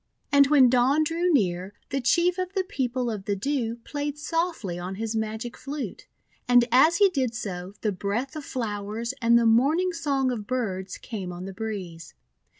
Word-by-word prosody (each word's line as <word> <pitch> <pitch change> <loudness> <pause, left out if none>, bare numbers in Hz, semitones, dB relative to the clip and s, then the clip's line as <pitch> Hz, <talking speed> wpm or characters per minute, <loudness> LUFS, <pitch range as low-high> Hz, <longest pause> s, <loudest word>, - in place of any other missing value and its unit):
And 280 -1 +6
when 275 -3 +6
Dawn 255 +5 +3
drew 335 +3 0
near, 190 - 0 0.2
the 275 - 0
Chief 345 +9 +2
of 370 +1 -3
the 385 -2 +1
People 255 - -2
of 205 -3 -6
the 205 - 0
Dew 235 +1 -1
played 290 0 -4
softly 325 - -2
on 180 +2 -5
his 225 +2 -3
magic 220 +2 -3
flute; 280 +1 -6 0.4
and 245 -1 +6
as 290 +7 +6
he 410 - +6
did 260 -9 -1
so, 190 -4 -5
the 215 - +1
breath 205 - -3
of 305 - -5
flowers 225 -1 -3
and 235 0 +5
the 235 - +3
morning 290 +11 +3
song 275 -6 0
of 215 -4 -5
birds 195 -7 -3
came 195 -6 -6
on 175 +1 -7
the 195 - -7
breeze. 185 -7 -6
240 Hz, 180 wpm, -26 LUFS, 205-285 Hz, 0.4 s, And